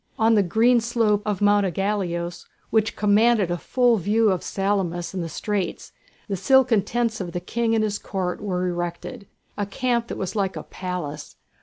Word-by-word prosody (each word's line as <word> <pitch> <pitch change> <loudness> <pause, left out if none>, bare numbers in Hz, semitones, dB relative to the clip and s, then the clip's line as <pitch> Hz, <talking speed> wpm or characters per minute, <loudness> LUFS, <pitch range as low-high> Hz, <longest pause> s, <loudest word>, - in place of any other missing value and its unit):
On 225 +1 +4
the 210 - +5
green 225 +7 +3
slope 225 -3 +1
of 205 -1 -1
Mount 205 0 +4
Ægaleos, 180 -2 -2 0.2
which 220 0 +1
commanded 210 -2 +3
a 175 - 0
full 245 +2 +2
view 215 +3 +2
of 185 - -1
Salamis 195 -3 -2
and 185 -2 -3
the 165 - -5
straits, 205 +4 -3 0.4
the 200 - -2
silken 240 +3 +4
tents 230 0 -1
of 175 -2 -5
the 175 - -2
King 225 +5 -1
and 220 - +2
his 210 -1 -1
Court 185 -2 -3
were 185 -3 -1
erected, 175 +2 -5 0.3
a 205 - -1
camp 235 +2 -1
that - - -5
was 190 +2 -4
like 195 -2 -1
a - - -6
palace. 175 -6 -6
205 Hz, 180 wpm, -23 LUFS, 180-225 Hz, 0.4 s, the